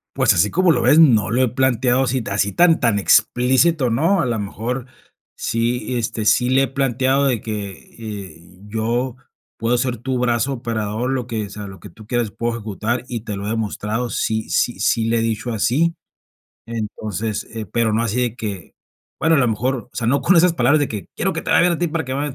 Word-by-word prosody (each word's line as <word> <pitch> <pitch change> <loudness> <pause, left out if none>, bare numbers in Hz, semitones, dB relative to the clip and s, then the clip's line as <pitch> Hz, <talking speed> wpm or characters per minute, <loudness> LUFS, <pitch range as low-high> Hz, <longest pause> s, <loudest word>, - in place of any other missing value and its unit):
Pues - - +4
así 105 - +2
como 185 -1 +3
lo - - +1
ves, 155 - +5
no 110 - +5
lo 125 +3 +2
he 130 - +4
planteado 130 0 +2
así 130 0 0
ta 100 -3 -4
así 100 0 +1
tan 170 - +4
tan, 115 -6 +2
explícito, 130 - +3
¿no? 160 +12 +2
A - - 0
la 115 -2 -1
mejor, 115 +5 -4 0.5
sí, 120 +2 -1
este, 110 -1 -3
sí 125 +4 +3
le 135 +1 +4
he - - 0
planteado 135 0 +1
de 125 -6 +1
que, 105 -3 -4 0.6
eh, 85 +2 -19
yo 115 +4 -1 0.4
puedo 115 +2 +1
ser 125 -1 -1
tu 125 +2 -3
brazo 120 +2 +1
operador, 115 -1 -3
lo 130 -2 -1
que 110 -4 -4
sea, 105 +1 -8
lo 95 -1 -10
que 105 - -11
tú 110 +5 -15
quieras 120 0 -1
puedo 115 +3 -3
ejecutar, 110 +2 -3
y 120 -2 -4
te 105 -2 -5
lo 100 +1 -5
he - - -2
demostrado, 110 +2 -2
sí 110 0 -2
sí 120 - +1
sí 115 -1 +1
le 115 +1 +1
he - - +1
dicho 115 +1 -2
así. 130 +10 +1 0.7
Entonces, 110 -1 -4
eh, 110 -1 -4
pero 110 +2 0
no 115 - +1
así 115 +2 -1
de 120 -2 -1
que, 100 -7 -6 0.5
bueno, 160 0 +3
a - - +3
lo 125 -3 +3
mejor, 125 +5 0
o - - -16
sea, 115 - -2
no 135 +4 +2
con 175 +7 +3
esas 175 +1 +5
palabras 145 0 +3
de 145 - 0
que: 105 -5 -6
"Quiero - - 0
que - - -3
te - - -4
vaya - - +5
bien 175 0 +3
a 165 - -2
ti 175 - 0
para 160 0 -2
que 130 0 -4
me". 145 +2 -1
120 Hz, 225 wpm, -20 LUFS, 110-130 Hz, 0.7 s, ves